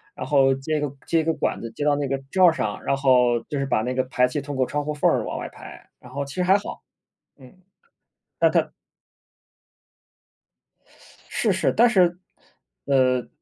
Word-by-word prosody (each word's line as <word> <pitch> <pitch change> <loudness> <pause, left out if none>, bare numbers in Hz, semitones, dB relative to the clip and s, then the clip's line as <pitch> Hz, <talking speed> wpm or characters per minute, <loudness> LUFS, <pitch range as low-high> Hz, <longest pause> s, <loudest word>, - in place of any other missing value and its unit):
然 - - -6
后 135 -1 +3
接 145 +4 -2
一 - - -1
个 145 -2 -3
接 165 - +1
一 - - 0
个 165 +1 0
管 - - -2
子 115 - -6
接 115 - -5
到 145 0 +3
那 145 -1 -2
个 135 +1 -1
罩 185 -1 +4
儿 165 - +4
上， 105 -9 -3
然 140 - 0
后， 125 -3 +3
就 145 -3 -5
是 135 - -1
把 110 -5 0
那 125 +2 -2
个 130 0 0
排 125 0 +1
气 125 +4 -3
通 145 +1 -6
过 130 -1 +1
窗 145 +2 -3
户 150 - -2
缝 145 - +2
儿 - - 0
往 - - -5
外 - - -6
排， - - -13
然 - - -15
后 140 +2 -3
其 140 0 -9
实 180 - 0
还 190 +2 +4
好。 205 - -8 0.6
嗯， 130 -3 -16 0.9
但 - - +4
它 - - +1 2.6
是 220 - 0
是， 190 - 0
但 240 +2 +5
是 180 -5 +3 0.7
呃， 130 -2 +2
140 Hz, 220 characters per minute, -23 LUFS, 130-160 Hz, 2.6 s, 但